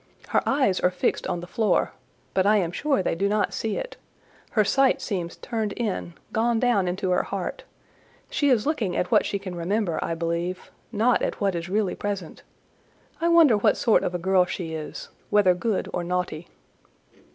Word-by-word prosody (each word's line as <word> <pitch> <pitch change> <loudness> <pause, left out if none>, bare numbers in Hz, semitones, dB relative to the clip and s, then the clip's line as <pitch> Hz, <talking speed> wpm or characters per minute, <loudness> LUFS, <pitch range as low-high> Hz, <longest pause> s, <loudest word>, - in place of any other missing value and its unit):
Her - - +3
eyes 260 -9 +2
are 180 - +3
fixed 180 - -1
on 175 - -2
the - - -7
floor, 210 +5 +1 0.4
but 190 +1 +2
I 215 +1 +5
am 175 -4 0
sure 275 +2 0
they - - 0
do 195 +4 0
not 210 0 +1
see 220 -2 -2
it—her 240 - -4
sight 270 +5 +3
seems 180 -6 -3
turned 220 -4 -3
in, 200 -7 -3 0.2
gone 230 +1 +2
down 230 -7 +2
into 185 +1 -1
her 180 - +3
heart: 195 -2 -5 0.6
she 285 -1 +1
is 235 -5 +3
looking 235 - -1
at 180 - -1
what - - +4
she 200 - -1
can 195 -2 -7
remember, 175 +1 -1
I 165 - -2
believe; 170 +2 -3 0.2
not 235 +3 +2
at - - -2
what 200 -2 +1
is 170 +1 -4
really 200 -1 0
present. 200 -5 -5 0.8
I 335 - +2
wonder 335 -8 +6
what 205 - +3
sort 225 - +3
of 180 - -2
a - - +1
girl 185 +1 +3
she 180 -3 -5
is—whether 180 +5 0
good 200 +3 -1
or 175 - -1
naughty." 180 -2 -3
195 Hz, 185 wpm, -25 LUFS, 180-225 Hz, 0.8 s, wonder